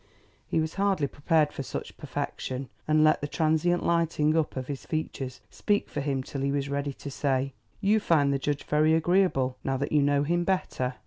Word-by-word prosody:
He - - +1
was 160 0 -1
hardly 195 -7 +2
prepared 150 +2 +1
for - - -4
such 135 - -6
perfection, 130 0 -4 0.2
and 155 0 +4
let 155 0 +4
the 145 - -2
transient 160 +3 +1
lighting 165 -2 +2
up 160 -2 0
of 130 - -3
his 140 0 -5
features 135 -5 -4
speak 205 0 0
for 145 - -3
him 135 -2 -1
till 135 +1 -5
he 140 0 0
was 140 -1 -1
ready 140 0 -2
to 140 - -8
say: 135 -1 0 0.3
"You 210 +2 +4
find 145 -8 +3
the 135 - 0
judge 145 +1 -2
very 155 +1 +3
agreeable, 160 -7 +2
now 135 0 0
that 140 +2 -3
you 150 - +4
know 145 0 +3
him 175 +3 +1
better?" 150 -9 -1
150 Hz, 200 wpm, -27 LUFS, 140-160 Hz, 0.3 s, and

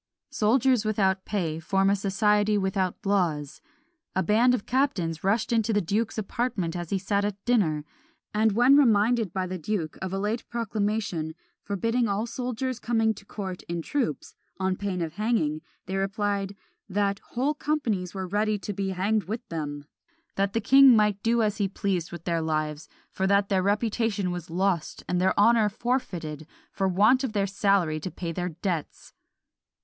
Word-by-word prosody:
Soldiers 245 +2 +3
without 195 -3 +1
pay 165 -6 -2
form 195 +4 +2
a - - +3
society 210 +1 +2
without 190 -1 -1
laws. 170 -8 0 0.5
A 190 - +2
band 235 +7 +4
of 215 - -5
captains 190 - 0
rushed 215 +5 +1
into 225 -1 +2
the 205 - +3
duke's 210 +6 -1
apartment 200 -5 -2
as 175 -2 -4
he 200 - +1
sat 200 +2 0
at 205 -1 -1
dinner; 170 -12 +2 0.5
and 215 0 +3
when 245 +5 +6
reminded 225 - +3
by 190 -1 -2
the 185 0 -5
duke 165 -3 -3
of 190 -1 -3
a 195 - -2
late 210 +4 -1
proclamation, 210 -8 -2 0.3
forbidding 230 +4 0
all 205 +2 -1
soldiers 250 +1 -3
coming 225 -1 +1
to 200 -1 -14
court 190 -3 -6
in 170 -1 -3
troops, 250 - -2 0.3
on 190 0 0
pain 185 -3 -2
of 160 -1 -5
hanging, 185 -9 0 0.2
they 190 - -4
replied, 200 0 -1 0.3
that 200 +1 0
"Whole 265 +5 -1
companies 230 - -2
were 190 -1 -3
ready 210 +3 0
to 205 +1 -5
be 195 0 -2
hanged 200 +3 0
with 225 +5 -5
them! 145 -3 -4 0.5
that 195 0 0
the 230 - 0
king 270 +2 +7
might 210 -2 +2
do 230 +1 +2
as 210 0 0
he 200 -2 +1
pleased 190 -3 -2
with 170 -2 -8
their 170 -2 0
lives; 155 -1 -2 0.2
for 190 - -1
that 200 0 +3
their 190 -2 +2
reputation 210 -1 0
was 175 -1 -6
lost, 180 -1 -1
and 180 0 0
their 190 +1 +2
honour 225 0 +5
forfeited, 175 - -3 0.2
for 195 -1 0
want 215 +8 +4
of 250 -5 -2
their 200 -2 +1
salary 195 -5 +1
to 170 - -5
pay 170 0 -5
their 180 +2 -3
debts." 170 -1 -4
200 Hz, 175 wpm, -26 LUFS, 180-220 Hz, 0.5 s, king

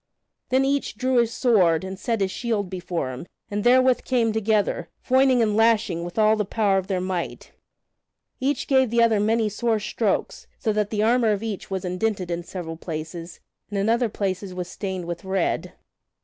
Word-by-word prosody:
Then 260 +1 +3
each 280 -4 -1
drew 255 +1 +1
his 235 -1 +3
sword 185 -11 +3
and 190 0 -6
set 230 -2 -1
his 190 -1 +1
shield 210 -5 -2
before 175 -7 -3
him, 130 +7 -8 0.2
and 205 0 -2
therewith 255 +1 +4
came 235 -4 +1
together, 215 -1 0 0.2
foining 260 -2 +4
and 210 -2 +1
lashing 220 -6 +2
with 175 +3 -7
all 215 0 +5
the 215 - 0
power 200 -1 +1
of 190 - -7
their 190 -2 -1
might. 180 -1 -4 0.9
Each 280 +2 0
gave 265 -3 +3
the 235 +1 +3
other 225 -2 +3
many 220 +1 +2
sore 220 +1 0
strokes, 215 - -2
so 220 - -1
that 210 -1 0
the 210 -1 0
armor 230 -1 +3
of 205 +1 -3
each 215 -4 -5
was 190 -1 -3
indented 180 0 -2
in 170 0 -2
several 170 -2 -7
places 165 +1 -7 0.3
and 205 - -3
in 200 +2 +1
other 235 0 +2
places 190 -2 -3
was 180 -1 -4
stained 190 -2 -5
with 175 +2 -5
red. 190 -1 -1
210 Hz, 190 wpm, -24 LUFS, 185-230 Hz, 0.9 s, all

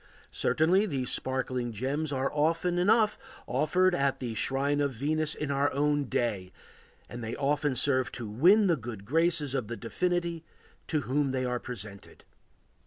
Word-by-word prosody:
Certainly 185 +7 +2
these 135 - -2
sparkling 130 -2 -2
gems 135 +7 -2
are 135 0 -1
often 165 +4 +1
enough 210 +3 +3 0.3
offered 175 +8 +2
at 140 -5 0
the 120 -3 -4
shrine 140 +5 0
of 140 -2 0
Venus 150 +5 0
in 150 -2 -3
our 140 +1 +1
own 145 +1 +1
day, 100 -8 -2 0.6
and 120 0 -8
they 110 - -4
often 145 0 0
serve 130 0 +1
to 120 -3 -5
win 175 - +5
the 175 -3 +3
good 110 -5 -8
graces 155 +1 +1
of 125 -6 -2
the 120 +1 -5
divinity 170 +5 -2 0.4
to 155 -2 0
whom 140 +1 0
they 130 -1 -1
are 125 -1 -1
presented. 105 -5 -9
140 Hz, 160 wpm, -29 LUFS, 125-160 Hz, 0.6 s, win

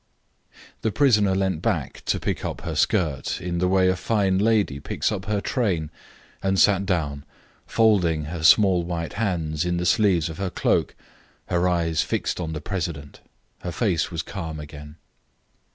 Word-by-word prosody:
The 110 - 0
prisoner 105 -8 +3
leant 95 -4 0
back - - -2
to - - 0
pick - - -3
up - - -4
her - - -4
skirt 75 -7 0
in 85 0 -3
the 90 - +2
way 95 0 +3
a 95 - +3
fine 95 -1 +1
lady 105 -9 +2
picks 70 - -2
up 95 -3 -4
her 105 -1 0
train, 95 - -1 0.5
and 95 0 +1
sat 100 0 +4
down, 75 -6 -1 0.4
folding 90 -9 +3
her 80 +1 -5
small 95 +1 +5
white 85 -2 -4
hands 85 -7 -1
in 90 0 -1
the 90 - -2
sleeves 90 -4 +3
of 80 -1 -7
her 95 -1 -1
cloak, - - 0 0.5
her 90 0 +2
eyes 85 -2 +1
fixed - - -2
on 80 -2 -3
the 75 - -5
president. 80 -5 -5 0.4
Her 90 - -5
face 90 -6 0
was 85 -2 -4
calm 80 -5 -6
again. 75 0 -10
90 Hz, 170 wpm, -24 LUFS, 80-100 Hz, 0.5 s, small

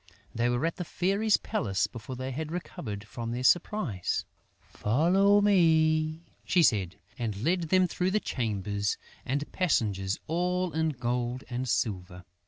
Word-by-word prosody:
They 120 +1 +1
were 120 +5 0
at 165 - -2
the 180 - -3
Fairy's 200 +5 +1
palace 95 -3 -1
before 115 +2 -7
they 130 +1 -4
had 155 +4 -4
recovered 110 - -5
from 115 +2 -6
their 120 +2 -3
surprise. 160 - +1 0.3
"Follow 185 - +3
me," 160 -4 +3 0.2
she 175 -2 +3
said 100 - +2 0.2
and 110 -3 -3
led 170 +1 +1
them 185 +1 +4
through 180 +2 -1
chambers 105 -3 -2 0.3
and 145 +3 -2
passages 105 - 0
all 180 +2 0
in 160 0 +1
gold 125 -1 -2
and 125 +1 -2
silver. 90 -5 -2
130 Hz, 140 wpm, -29 LUFS, 110-175 Hz, 0.3 s, them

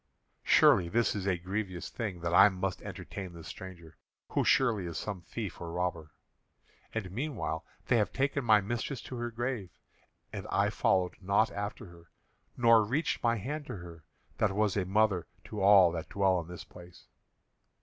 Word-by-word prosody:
Surely 85 - +5
this 115 +5 +2
is 100 -1 -3
a 95 -2 +2
grievous 95 0 -4
thing 100 -7 -4
that 85 0 -2
I 100 +3 +8
must 95 -1 -3
entertain 95 -3 -7
this 85 -1 -10
stranger, 90 -4 -10 0.3
who - - +1
surely 110 -9 +3
is 85 -2 -5
some 100 -4 -4
thief 100 +2 -6
or 85 -1 -5
robber. 85 -3 -2 0.8
And 105 -5 -4
meanwhile 110 - -3 0.2
they 120 - +3
have 105 - +1
taken 140 +1 0
my 110 -3 +5
mistress 120 +5 -3
to 125 - -7
her 120 0 -3
grave, 120 -4 -3 0.6
and - - -6
I - - +2
followed 95 -2 +1
not 100 +4 +2
after 100 +1 -5
her, 85 -1 -16 0.5
nor 115 -2 +6
reached 140 +10 -1
my 115 -1 +2
hand 145 +8 -5
to - - -5
her, 85 -3 -10 0.4
that 100 -3 +2
was 105 -1 +1
as 100 -3 0
a - - -9
mother 100 -3 +2 0.2
to 105 - -6
all 95 -3 +7
that 85 0 -5
dwell 95 -2 +2
in 80 - -11
this 90 0 -8
place." 90 -1 -15
100 Hz, 180 wpm, -31 LUFS, 90-110 Hz, 0.8 s, I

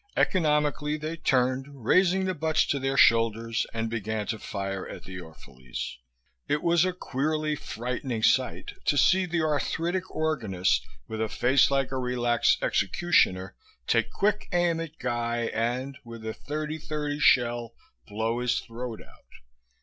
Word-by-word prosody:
Economically 150 -3 +2
they 155 +2 -4
turned, 130 -2 0
raising 190 +5 +4
the 185 - 0
butts 160 -1 +1
to 140 - 0
their 135 +1 -1
shoulders, 115 -1 +3
and 115 0 -2
began 110 -1 -3
to 110 0 -3
fire 95 -1 -4
at - - -9
the 95 0 -8
Orphalese. 65 -8 -8 0.5
It 150 +1 0
was 170 0 +4
a 185 - +1
queerly 155 -2 -1
frightening 125 -2 -4
sight 130 +1 +2
to 145 - +2
see 185 +7 +4
the 170 -1 0
arthritic 165 +5 -1
organist, 110 - 0 0.2
with 110 0 -4
a 110 - 0
face 130 +5 +3
like 135 -1 0
a 130 - -2
relaxed 120 -1 +1
executioner, 95 - +2 0.3
take 115 - +2
quick 210 +1 0
aim 175 -2 +2
at 165 -1 -6
Guy 120 -2 -1
and, 125 +4 -2
with 115 -2 -10
a 110 - -3
thirty 155 +4 -4
thirty 150 -1 -3
shell, 120 -4 +3 0.3
blow 110 +3 -1
his 125 -1 +1
throat 115 -1 -7
out. - - -19
130 Hz, 150 wpm, -27 LUFS, 115-155 Hz, 0.5 s, raising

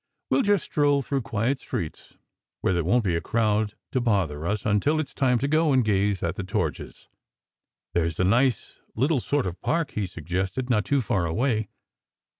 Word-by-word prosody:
We - - +4
ll - - +5
just 205 -6 +2
stroll 145 -2 +2
through 135 +1 -1
quiet 115 +4 -1
streets, 80 -9 -6 0.5
where - - +1
there 85 -1 +1
won 115 +8 +2
t 100 - 0
be 85 - +1
a 85 - -1
crowd 110 -2 0 0.2
to 130 - 0
bother 90 -9 0
us, 105 +1 -2
until 110 +9 +2
it 155 - 0
s - - -17
time 125 -3 +2
to 140 - -1
go 155 +1 +3
and 130 -3 +3
gaze 100 -2 +1
at 85 +2 -1
the 100 - -3
torches." 95 - -3 0.9
"There 85 -1 +2
s 80 -1 -5
a - - +3
nice 120 +4 +1 0.2
little 135 +5 +2
sort 145 +3 0
of 90 -1 -5
park," 165 -1 0
he 105 -3 -2
suggested, 95 - -3
"not 105 -4 +2
too 140 -1 +2
far 95 -6 0
away. 110 +4 0
110 Hz, 205 wpm, -25 LUFS, 95-135 Hz, 0.9 s, ll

